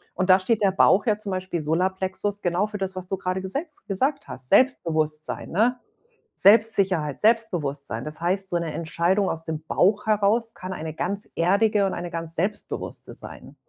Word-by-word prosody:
und 185 0 -1
da 185 - +7
steht 215 +3 0
der 195 - +3
Bauch 195 +3 +4
ja 210 -2 +1
zum 205 -2 -6
Beispiel- 185 -3 -3
Solarplexus- 190 +5 -1
genau 180 +4 0
für 210 - -6
das, 190 -1 -3
was 185 -1 -6
du 195 - -2
grade 185 0 -2
gese 270 - -3 0.2
gesagt 265 +9 -1
hast. 130 0 -9
Selbstbewusstsein, 155 - +1
ne? 230 +7 +2 0.6
Selbstsicherheit, 195 - +4
Selbstbewusstsein. 150 - 0
Das 155 +1 -7
heißt, 190 +3 0
so 175 - 0
'ne 165 -2 -3
Entscheidung 175 +4 0
aus 165 0 -3
dem 160 -1 -5
Bauch 205 +3 +2
heraus 215 +2 +2
kann 185 +1 -7
eine 160 -2 -6
ganz 195 +5 -3
erdige 200 +4 +2
und - - -3
eine 175 0 -5
ganz 165 0 -5
selbstbewusste 195 +6 -4
sein. - - -9
190 Hz, 175 wpm, -24 LUFS, 165-205 Hz, 0.6 s, da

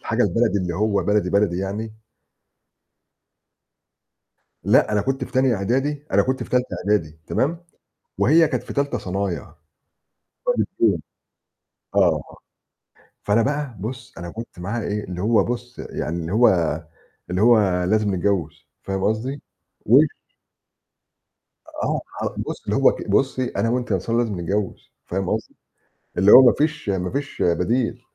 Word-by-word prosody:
الحاجة - - 0
البلدي 100 +3 +2
اللي 85 -2 -3
هو 100 -1 +1
بلدي، 105 -3 +1
بلدي 100 -3 +2
يعني؟ 105 +3 -5 2.6
لأ، - - +4
أنا 105 -1 +2
كنت 135 +4 -2
في - - -10
تانية 130 -2 +2
إعدادي 135 +9 -1
أنا 100 - +5
كنت 130 +3 -1
في - - -12
تالتة 125 0 +1 0.2
إعدادي، 85 -7 0
تمام؟ 170 +5 -1 0.5
وهي 160 +4 +5
كانت - - -2
في - - -8
تالتة 140 0 -1
صنايع. 95 -1 -3 1.0
ففرق - - +2
سنين 100 -8 +3 0.9
آه. - - +3 1.0
فأنا 105 +3 +3
بقى 140 -1 -2
بُص، 125 +7 -6
أنا 85 +1 -6
كنت 115 -4 -9
معاها 105 +6 -3
إيه؟ 105 0 -2
اللي 90 -1 -6
هو 110 +3 +3
بُص، 120 +1 -5
يعني 85 +3 -4
اللي 80 +1 -5
هو 115 +4 +5 0.8
اللي 90 +2 -1
هو 105 -6 +4
لازم 105 +1 +1
نتجوز، 90 -4 -2 0.2
فاهم 95 -1 -3
قصدي؟ 120 +7 -1 0.4
وال - - +6 1.8
آه، - - 0 0.2
ه - - +1
بُص، - - -5
اللي - - -1
هو - - +5
ك - - -7
"بُصي 130 -2 +1
أنا 115 - +1
وأنتِ 125 +1 -1
يا - - +3
أنتصار 115 +6 -1
لازم 110 -6 -1
نتجوز."، 95 +3 -3
فاهم 95 0 -2
قصدي؟ - - -3 0.6
اللي 95 +3 +5
هو 130 - +11
ما 125 -2 +6
فيش 150 -6 -1
ما 90 -2 -1
فيش 140 +2 -4
بديل. 110 +8 +1
105 Hz, 145 wpm, -22 LUFS, 95-125 Hz, 2.6 s, هو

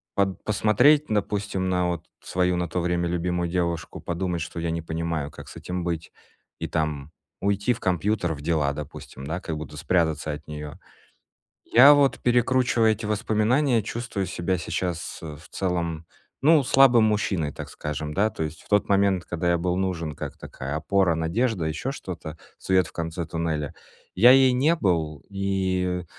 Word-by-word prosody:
под 100 -1 0
посмотреть, 115 +9 +4
допустим, 100 -2 -1
на 90 -1 +1
вот 85 -2 -3 0.2
свою 90 0 +1
на 90 - -1
то 90 +2 -1
время 85 0 0
любимую 90 0 -1
девушку, 85 -2 -2
подумать, 85 -1 -2
что 80 - -5
я 85 0 -2
не 85 - -2
понимаю, 80 -2 -3
как - - -11
с - - -12
этим 90 0 -4
быть, 85 -2 -3 0.5
и - - -3
там- 75 -2 -2 0.3
уйти 100 +4 +1
в 115 - -9
компьютер, 90 0 0
в 70 - -10
дела, 75 -2 +1
допустим, 70 -2 -8
да, 80 +4 -2
как 80 - -4
будто 75 -1 -8
спрятаться 80 -2 0
от 75 0 -9
неё. 75 -1 -7 0.9
Я 135 +5 +8
вот, 140 -2 +3
перекручивая 120 -1 +3
эти 110 0 -5
воспоминания, 110 +5 +2
чувствую 115 -2 -3
себя 90 +1 -1
сейчас, 85 0 -3
э, 75 -2 -7
в 80 - -16
целом, 85 -3 -2 0.4
ну, 155 +1 +6
слабым 125 -3 +6
мужчиной, 95 -8 0
так - - -8
скажем, 75 0 -5
да. 105 +5 +2
То 80 - -4
есть 80 0 -7
в - - -22
тот 105 -1 +3
момент, 100 -2 +2
когда 85 0 -1
я 85 - +2
был 90 +1 0
нужен 85 -5 -2
как - - -6
такая 70 +3 -6
опора, 95 +2 +2
надежда, 90 +3 0
ещё 80 - -3
что-то, 80 - -7 0.2
свет 95 -1 +2
в - - -16
конце 85 0 -4
туннеля, 80 -3 -2 0.4
я 115 +7 +7
ей 130 -1 +6
не 140 +7 +3
был. 80 - 0
И 95 -2 -1
90 Hz, 170 wpm, -25 LUFS, 80-105 Hz, 0.9 s, Я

